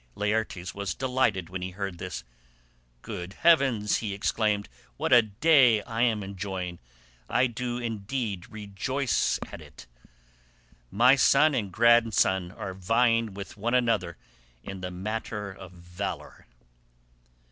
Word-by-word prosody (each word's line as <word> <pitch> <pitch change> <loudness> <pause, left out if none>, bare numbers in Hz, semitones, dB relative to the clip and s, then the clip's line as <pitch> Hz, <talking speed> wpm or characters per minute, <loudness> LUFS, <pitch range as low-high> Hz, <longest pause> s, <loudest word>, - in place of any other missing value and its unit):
Laertes 105 -4 -2
was 100 -1 -4
delighted 125 -9 0
when 95 -1 -5
he 90 - -3
heard 95 -2 -5
this. - - -6 0.8
"Good 90 +2 -6
heavens," 135 -11 +3
he 105 -3 -4
exclaimed, 105 0 0 0.3
"what - - +1
a 120 - +9
day 115 +1 +4
I 115 -1 -3
am 110 -4 +2
enjoying: 95 -2 -5 0.5
I 125 - +3
do 120 0 -3
indeed 110 -3 -4
rejoice 110 +6 -1
at - - -9
it. 75 -5 -14 1.0
My 125 - +5
son 145 +3 +4
and 100 -7 -2
grandson 110 -5 +3
are 95 -1 -6
vying 115 +2 +1
with 100 +1 -8
one 120 +4 0
another 110 -9 +1 0.5
in 100 -1 -7
the 90 - -4
matter 105 +2 -4
of 95 -1 -11
valour." 90 +2 -7
105 Hz, 125 wpm, -27 LUFS, 95-120 Hz, 1.0 s, a